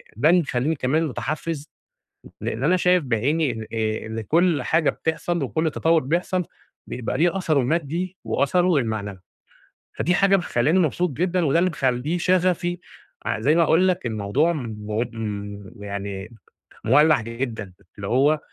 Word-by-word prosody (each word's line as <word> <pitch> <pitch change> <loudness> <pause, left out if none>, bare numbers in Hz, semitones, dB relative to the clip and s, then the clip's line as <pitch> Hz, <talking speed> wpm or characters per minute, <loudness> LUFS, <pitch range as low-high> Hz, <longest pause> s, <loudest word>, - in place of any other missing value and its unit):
ده 135 +9 +3
اللي 175 +1 +5
مخلّيني 140 +1 -1
كمان 140 +4 +1
متحفز، 150 +2 -4 0.7
لأن 115 +4 -3
أنا 180 +5 +4
شايف 180 -2 +3
بعيني 135 +6 +1
إن 110 - -6
آآ 110 -1 -2
إن 110 0 -4
كُلّ 165 - +2
حاجة 160 -2 +2
بتحصل 165 +1 -2
وكُلّ 160 +4 0
تطوُّر 165 +2 +2
بيحصل 175 +6 -1 0.4
بيبقى 125 -2 -4
ليه 175 +2 +2
أثره 160 -6 +1
المادي 165 +6 -1
وأثره 180 +4 +2
المعنوي. 110 -6 -2 0.8
فدي 175 - 0
حاجة 195 +1 +4
مخلّياني 160 0 +1
مبسوط 175 +2 +1
جدًا، 180 +4 0
وده 150 +3 +3
اللي 185 +2 +2
مخلّيه 135 +1 -1
شغفي 175 -1 +1 0.5
ع - - -1
زي 140 +8 +3
ما 170 - +5
باقول 165 +4 +4
لك 180 -4 0
الموضوع 115 +9 +1
مو 110 -6 -4
م 100 -2 -6
يعني 100 +2 -6 0.5
مولّع 150 +3 +5
جدًا، 115 -4 -5 0.2
اللي 100 -1 -5
هو 145 +6 +3
150 Hz, 150 wpm, -23 LUFS, 115-170 Hz, 0.8 s, اللي